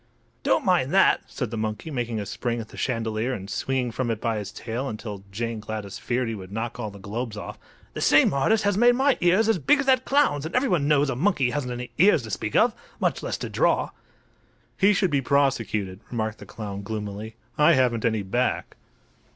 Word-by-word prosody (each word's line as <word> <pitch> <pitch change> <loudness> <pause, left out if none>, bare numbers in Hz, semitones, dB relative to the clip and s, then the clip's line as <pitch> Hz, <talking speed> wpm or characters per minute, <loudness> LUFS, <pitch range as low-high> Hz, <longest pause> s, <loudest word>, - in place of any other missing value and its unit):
"Don't - - +1
mind - - +2
that," - - +5
said - - -4
the 115 - -3
monkey, 110 +8 -3
making 120 -4 -2
a 100 - -4
spring 115 +5 -3
at 110 - -7
the - - -13
chandelier 115 0 -1
and 95 0 -7
swinging 125 +2 -1
from 120 +1 -2
it 115 -2 -1
by 115 -2 -1
his 105 -1 -6
tail 125 +6 -4
until 105 -2 -7
Jane 115 +2 -3
Gladys 105 -2 -6
feared 125 0 -1
he 115 - -2
would 95 -3 -8
knock 115 +3 -4
all 110 -3 -3
the 100 - -12
globes 105 +3 -5
off; - - -7 0.3
"the - - -5
same - - +5
artist 215 +11 +2
has 205 -1 +2
made 240 +1 +6
my 270 +1 +3
ears 185 +5 +4
as 225 -5 +2
big 165 - +4
as 285 - 0
that 260 -1 +4
clown's 275 - +2
and 160 - -5
everyone 180 - +2
knows 145 -2 +3
a - - -2
monkey 140 -4 +1
hasn't 130 -3 -2
any 120 0 -6
ears 180 -7 +5
to 110 - -7
speak 105 - -3
of—much 225 +1 0
less - - -3
to - - -5
draw." - - +1 0.8
"He 200 +1 +4
should 195 -4 +1
be 140 -1 +2
prosecuted," 115 -9 0
remarked 110 -2 -3
the - - -11
clown, 100 -3 -6
gloomily. 105 +1 -5 0.2
"I 150 +3 +5
haven't 125 -5 +2
any 110 -3 +1
back." 120 +7 -1
120 Hz, 210 wpm, -25 LUFS, 110-145 Hz, 0.8 s, made